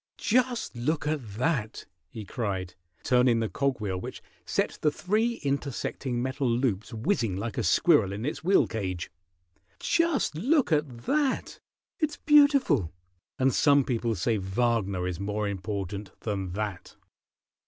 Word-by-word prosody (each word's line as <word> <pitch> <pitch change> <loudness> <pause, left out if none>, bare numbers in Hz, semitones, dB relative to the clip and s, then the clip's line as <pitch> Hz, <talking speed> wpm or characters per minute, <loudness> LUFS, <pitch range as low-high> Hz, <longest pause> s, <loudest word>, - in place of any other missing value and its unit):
"Just 245 - 0
look 150 +6 -1
at 140 -10 -3
that!" 120 -3 -1 0.2
he 110 +3 -8
cried, 95 -6 -3 0.3
turning 125 -2 +4
the 110 - 0
cog 135 +6 -1
wheel 95 -4 -2
which - - -8 0.2
set - - -1
the 155 - +4
three 215 +9 0
intersecting 135 -3 -2
metal 130 0 -1
loops 115 -3 0
whizzing 115 - 0
like 110 +3 -4
a - - -1
squirrel 105 - +4
in 105 +4 -4
its 150 - -3
wheel 190 +3 +4
cage. 90 -6 -4 0.7
"Just 335 - +1
look 255 - +2
at 140 -6 -1
that! 290 -3 0 0.4
It's 310 -2 -1
beautiful, 280 - +4 0.5
and 130 0 +2
some 145 -1 +5
people 115 -3 -1
say 110 +4 0
Wagner 100 -2 0
is 90 -1 -4
more 105 +1 -2
important 100 -1 -5
than 95 -4 -3
that." 105 -2 -5
120 Hz, 140 wpm, -28 LUFS, 100-150 Hz, 0.7 s, some